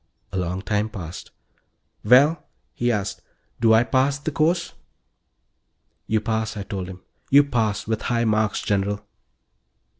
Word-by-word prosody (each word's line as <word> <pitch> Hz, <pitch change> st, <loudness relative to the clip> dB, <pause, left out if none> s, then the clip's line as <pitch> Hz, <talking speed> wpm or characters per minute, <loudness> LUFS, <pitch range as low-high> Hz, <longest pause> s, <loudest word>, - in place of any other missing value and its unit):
A 95 Hz, -, -3 dB
long 90 Hz, +2 st, -3 dB
time 105 Hz, 0 st, 0 dB
passed. 90 Hz, -5 st, -8 dB, 0.7 s
"Well," 135 Hz, +9 st, +5 dB, 0.3 s
he 120 Hz, 0 st, 0 dB
asked, 100 Hz, -3 st, -2 dB, 0.4 s
"do 115 Hz, -1 st, +4 dB
I 110 Hz, +1 st, +6 dB
pass 135 Hz, +3 st, +1 dB
the 145 Hz, +2 st, -4 dB
course?" 165 Hz, +3 st, +1 dB, 1.3 s
"You 110 Hz, -, +2 dB
pass," 110 Hz, -1 st, -2 dB
I 100 Hz, -, -4 dB
told 95 Hz, -2 st, -5 dB
him. 90 Hz, -1 st, -10 dB, 0.3 s
"You 140 Hz, +1 st, +7 dB
pass 110 Hz, -7 st, -1 dB
with 110 Hz, -1 st, -2 dB
high 120 Hz, -1 st, 0 dB
marks, 110 Hz, -1 st, +1 dB
General." 100 Hz, 0 st, -1 dB
110 Hz, 140 wpm, -23 LUFS, 100-125 Hz, 1.3 s, You